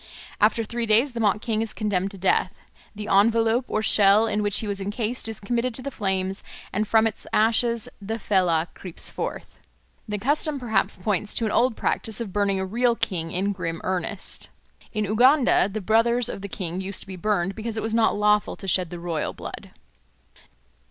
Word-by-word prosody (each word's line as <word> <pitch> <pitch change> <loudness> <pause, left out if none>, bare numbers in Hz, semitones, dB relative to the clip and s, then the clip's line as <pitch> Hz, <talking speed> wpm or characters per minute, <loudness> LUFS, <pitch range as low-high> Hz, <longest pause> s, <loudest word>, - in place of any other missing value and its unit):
After 220 +2 +3
three 235 +1 -3
days 230 +6 +4
the 235 - -5
mock 210 -1 +2
king 220 -2 -1
is 225 -1 -3
condemned 200 -3 0
to 200 - -11
death; 185 0 +1 0.4
the 210 0 -6
envelope 225 +4 +3
or 215 - -1
shell 205 +1 +5
in 210 -1 0
which 205 -1 +1
he 220 - -4
was 200 -1 -3
encased 220 +4 -3
is 220 - -6
committed 235 +3 -1
to 255 - 0
the 280 - -4
flames, 190 -3 -2 0.3
and 210 +2 0
from 220 +1 +4
its 225 - -3
ashes 230 +1 +2
the 220 +3 -3
Fellah 180 -6 +1
creeps 180 -3 -6
forth. - - -6 0.5
The 210 - -1
custom 290 +6 0
perhaps 230 -5 0
points 205 +2 -1
to 230 - 0
an 215 - -1
old 245 0 +2
practice 220 -3 -1
of 215 -6 -5
burning 200 -2 +1
a 190 - -1
real 235 +4 +1
king 180 -8 -2
in 195 +4 0
grim 165 -4 -4
earnest. 185 +2 -3 0.4
In 215 -1 -1
Uganda 245 +2 +4
the 215 +2 -4
brothers 230 +4 +2
of - - -6
the 200 - -6
king 185 -2 -4
used 190 0 -2
to - - -10
be 190 - -7
burned, 190 0 0
because 225 +2 -5
it - - -2
was 220 0 -1
not 225 -1 +3
lawful 210 0 +2
to 195 - -9
shed 180 -1 +1
the 175 - -7
royal 170 -3 -3
blood. - - -8
210 Hz, 200 wpm, -24 LUFS, 195-225 Hz, 0.5 s, shell